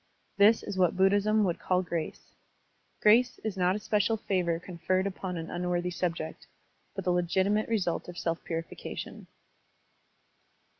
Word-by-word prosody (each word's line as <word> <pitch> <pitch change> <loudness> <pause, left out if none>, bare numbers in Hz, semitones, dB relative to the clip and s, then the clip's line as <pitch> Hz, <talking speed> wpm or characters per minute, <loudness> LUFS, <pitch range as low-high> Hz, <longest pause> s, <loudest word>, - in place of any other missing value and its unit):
This 210 +3 +5
is 190 - -4
what 180 -1 +3
Buddhism 205 +3 +3
would 175 -4 0
call 185 0 +1
grace. 170 -3 -5 0.7
Grace 240 +4 +5
is 220 -3 -2
not 185 0 +2
a - - -2
special 210 +1 +1
favor 180 -5 0
conferred 185 +2 -1
upon 190 -2 -4
an 165 0 -6
unworthy 180 0 -1
subject, 165 -2 -3 0.5
but 195 - -4
the 180 - +1
legitimate 190 +5 +1
result 185 -7 -1
of 175 - -9
self 165 0 -2
purification. 165 -1 -6
185 Hz, 140 wpm, -29 LUFS, 175-205 Hz, 0.7 s, This